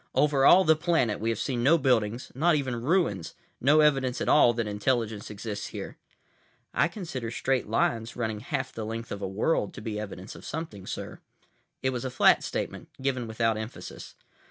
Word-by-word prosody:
"Over 140 -2 +4
all 190 +2 +8
the 160 -2 +5
planet 155 - +1
we 115 - -1
have 115 - 0
seen 125 0 -2
no 150 +7 +5
buildings, 120 -4 +1
not 160 +5 +3
even 130 -5 -2
ruins, 130 - 0 0.2
no 145 +4 +5
evidence 135 -4 +2
at - - -2
all 135 -5 +6
that 115 -1 -1
intelligence 105 0 -1
exists 105 0 -5
here." - - -7 0.7
"I - - +3
consider 165 - -5
straight 130 +1 -1
lines, 115 +1 0
running 110 -3 -2
half 130 +2 -3
the 110 - -5
length 115 +1 -5
of 100 - -5
a 95 - -2
world, 105 +4 0
to - - -8
be 105 -1 -4
evidence 100 -2 -7
of - - -12
something, 135 - -6
sir." - - -6 0.6
It 130 - +2
was 125 -2 -4
a 130 - -2
flat 130 - +4
statement, - - -4
given 130 -3 -1
without 110 0 0
emphasis. 110 +2 -8
120 Hz, 185 wpm, -28 LUFS, 110-140 Hz, 0.7 s, all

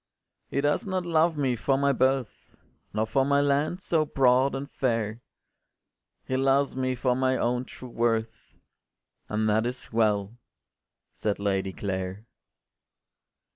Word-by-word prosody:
“He 140 - 0
does 145 +9 0
not 185 -2 -1
love 165 -1 +2
me 135 -4 +1
for 135 +4 +1
my 140 0 +3
birth, 130 -2 -1 0.4
Nor 110 +1 0
for 125 +5 +1
my 140 +1 +3
lands 145 +6 +1
so 160 -2 +2
broad 135 -2 +3
and 135 +1 -4
fair; 115 -5 -1 1.0
He 130 - -2
loves 135 +1 +2
me 130 -1 -1
for 125 0 +1
my 130 0 +1
own 125 +1 0
true 130 - -11
worth, 115 -2 -1 0.8
And 110 +1 0
that 110 +2 +2
is 125 -1 -7
well,” 105 0 +1 0.7
said 105 -2 -2
Lady 95 -1 -1
Clare. 95 +1 -4
130 Hz, 135 wpm, -27 LUFS, 110-140 Hz, 1.0 s, my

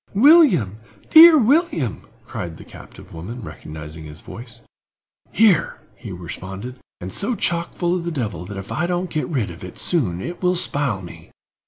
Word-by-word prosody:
"William—dear 275 - +6
William!" 250 - +1 0.2
cried 85 -2 -6
the - - -12
captive - - -14
woman, 105 +9 -8
recognizing 75 0 -9
his 75 +1 -11
voice. 115 0 -11 0.7
"Here!" 205 -7 +3 0.2
he 105 0 -10
responded, 95 +7 -8 0.2
"and 95 +1 -7
so 230 +4 0
chock 170 -3 -1
full 175 -1 0
of 180 -2 -2
the 170 - -3
devil 110 - -4
that 100 +1 -8
if 100 - -8
I 170 +2 -1
don't 180 0 -2
get 155 - -2
rid 125 - -2
of 85 - -12
it 90 - -9
soon 110 - 0
it 170 - -7
will 180 0 +2
spile 140 - -1
me. 85 - -12
125 Hz, 165 wpm, -21 LUFS, -, 0.7 s, William—dear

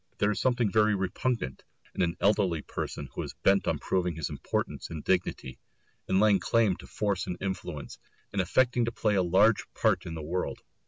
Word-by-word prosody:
There 105 +1 +2
is 105 - -2
something 120 -5 +2
very 105 0 +4
repugnant 95 - -2 0.3
in - - -2
an 85 -1 0
elderly 100 -6 +2
person - - -5
who - - -3
is - - -6
bent 100 0 +4
on - - +1
proving 90 -3 -1
his 80 -3 -3
importance - - -3
and 80 -2 -6
dignity, 90 -8 -1 0.5
in 95 - +2
laying 105 -2 +5
claim 110 -5 +2
to - - -12
force 100 -3 -1
and 90 - -3
influence, 90 -6 -5 0.3
in 100 - -1
affecting 120 +6 +2
to 115 - -2
play 110 -2 0
a 95 - +3
large 95 +5 +3
part - - +1
in 85 - -5
the 80 - -6
world. 90 +4 -3
95 Hz, 195 wpm, -29 LUFS, 90-105 Hz, 0.5 s, laying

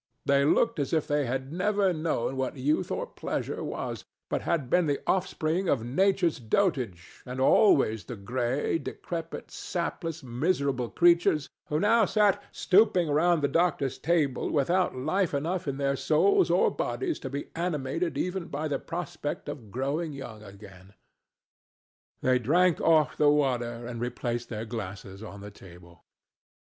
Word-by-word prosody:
They 140 0 +3
looked 150 - +2
as 140 - -2
if 160 -2 +2
they 145 -2 +1
had 130 +3 -3
never 195 +1 +1
known 155 -6 -1
what 130 +1 -2
youth 150 +7 0
or - - -2
pleasure - - -4
was, - - -4 0.3
but - - 0
had 160 -7 -1
been 175 +5 +2
the 145 -1 0
offspring 180 -1 0
of 120 -5 +1
Nature's 175 +4 +2
dotage, 120 - -1
and 125 0 -6
always 130 - +4
the 120 - -6
gray, 125 +9 -1
decrepit, 165 -1 -6
sapless, 165 -3 -4
miserable 130 -1 -1
creatures 170 -4 +3 0.2
who 150 - 0
now 220 +4 +4
sat 205 0 +2
stooping 185 -5 +3
round 165 +1 +3
the - - +4
doctor's 155 -3 0
table 155 -6 +1
without 170 +2 +1
life 155 +5 0
enough 170 +4 -2
in 135 -1 -2
their 140 -1 0
souls 380 - +3
or - - +3
bodies 355 -4 -2
to 135 - -6
be 140 +2 -5
animated 165 -1 -2
even 180 -1 -2
by 150 +2 -3
the 145 - -1
prospect 170 -3 -5
of 140 -7 -7
growing 140 - -2
young 120 -6 -8
again. 100 -2 -14 1.3
They 130 -1 +3
drank 170 +8 +3
off 155 -4 +3
the 150 -1 +5
water 120 -5 0
and 120 -1 -6
replaced 120 -1 -3
their 110 -1 -4
glasses 100 -3 -7
on 100 -2 -9
the 105 0 -9
table. 85 -3 -16
145 Hz, 155 wpm, -28 LUFS, 125-175 Hz, 1.3 s, the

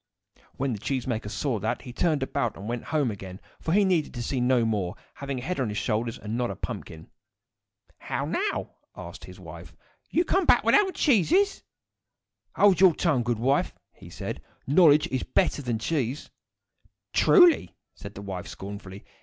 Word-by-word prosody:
When 135 -1 -1
the 105 - -5
cheese 130 +2 -2
maker 110 -4 -3
saw 120 0 -2
that, 110 +4 -2
he 125 -3 -9
turned 155 -2 +1
about 120 -3 -2
and 100 - -8
went 120 0 -4
home 145 -6 0
again, 95 -2 -9 0.2
for 160 - -3
he 200 +3 +4
needed 170 -7 0
to 120 - -4
see 130 +1 -2
no 125 -1 +3
more, 100 -5 -1 0.2
having 140 -1 -5
a 125 - -6
head 180 +1 -3
on 125 -4 0
his 105 - -4
shoulders, 115 +1 -1
and 105 +1 -5
not 120 0 -1
a - - -4
pumpkin. 80 0 -7 0.9
"How 140 - -3
now?" 390 - -2 0.3
asked - - -9
his - - -13
wife. - - -11 0.3
"You 345 - +1
come 375 +2 +1
back - - +5
without 415 -2 +5
the 380 - -5
cheeses?" 330 - +2 0.9
"Hold 195 -3 +4
your 185 -4 +7
tongue, 150 -8 +1
good 120 -1 -1
wife!" 135 +5 +1 0.2
he - - -14
said. - - -6 0.2
"Knowledge 150 0 +5
is 130 - -1
better 175 -5 0
than 120 -4 -2
cheese." 135 +2 -2 0.8
"Truly!" 355 -5 +5 0.2
said 100 -1 -10
the 100 - -8
wife, 95 -3 -6
scornfully. 100 0 -9
130 Hz, 180 wpm, -26 LUFS, 110-165 Hz, 0.9 s, your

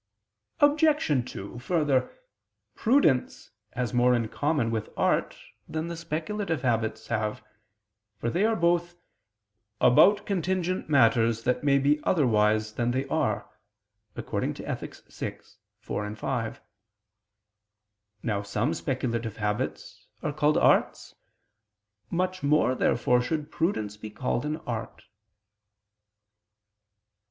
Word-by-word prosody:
Obj. 290 - +3
2: 100 +5 -8
Further, 140 -3 +1 0.6
prudence 220 - +2 0.2
has 125 -1 -2
more 125 0 +4
in 115 -2 -1
common 145 -5 0
with 110 -2 -3
art - - +1 0.3
than 160 +1 -3
the 170 - -4
speculative 165 0 -3
habits 115 -3 0
have; 105 -1 -2 0.7
for 115 - -2
they 180 - +1
are 225 +1 +3
both 175 0 +1 0.8
"about 200 +12 +5
contingent 185 -2 -1
matters 115 -4 +3
that 125 +3 0
may 140 -1 +4
be 145 +2 +2
otherwise 110 - +2
than 120 +2 0
they 130 +2 -1
are" 110 -11 0 0.7
(Ethic. - - -4
vi, - - -5 0.5
4, 105 0 -4
5). 115 0 -3 1.6
Now 105 -3 -1
some 105 +3 -1
speculative 115 -5 -3
habits 105 -1 -3 0.2
are 150 - -1
called 150 +1 +2
arts. - - +2 1.0
Much 185 +1 -1
more, 145 -3 +3
therefore, 125 -1 +2
should 150 +3 -3
prudence 110 - -1
be 110 0 -8
called 125 +4 -2
an 155 +1 -2
art. 115 -2 -5
130 Hz, 110 wpm, -27 LUFS, 115-165 Hz, 1.6 s, about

